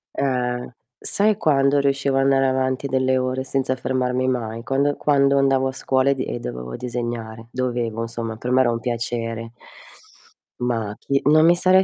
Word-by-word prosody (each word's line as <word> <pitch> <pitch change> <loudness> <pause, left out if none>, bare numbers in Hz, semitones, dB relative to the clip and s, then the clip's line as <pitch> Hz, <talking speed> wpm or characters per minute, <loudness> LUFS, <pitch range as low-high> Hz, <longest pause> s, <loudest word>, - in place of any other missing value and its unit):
Eh, 125 -2 -2 0.2
sai 210 0 +2
quando 140 -1 +3
riuscivo 140 -1 +1
andare 135 0 +3
avanti 130 +1 0
delle 130 0 +1
ore 130 +1 -1
senza 135 -1 -1
fermarmi 130 0 -1
mai? 115 -3 -2
Quando 140 +3 0
quando 140 -1 +3
andavo 135 -1 +2
a - - -3
scuola 130 +1 +1
e - - +4
di 130 -2 -4
dovevo 60 - -6
disegnare; 120 -2 -5
dovevo 120 -3 -2
insomma 115 -1 -5
per 125 +2 -4
me 130 - +4
era 120 - +3
un 115 - -2
piacere. 115 -1 -3 1.1
Ma 115 -4 -2
chi 140 0 0
non 155 +2 +5
mi 175 +1 +6
sarei 185 +2 +4
130 Hz, 160 wpm, -22 LUFS, 120-135 Hz, 1.1 s, mi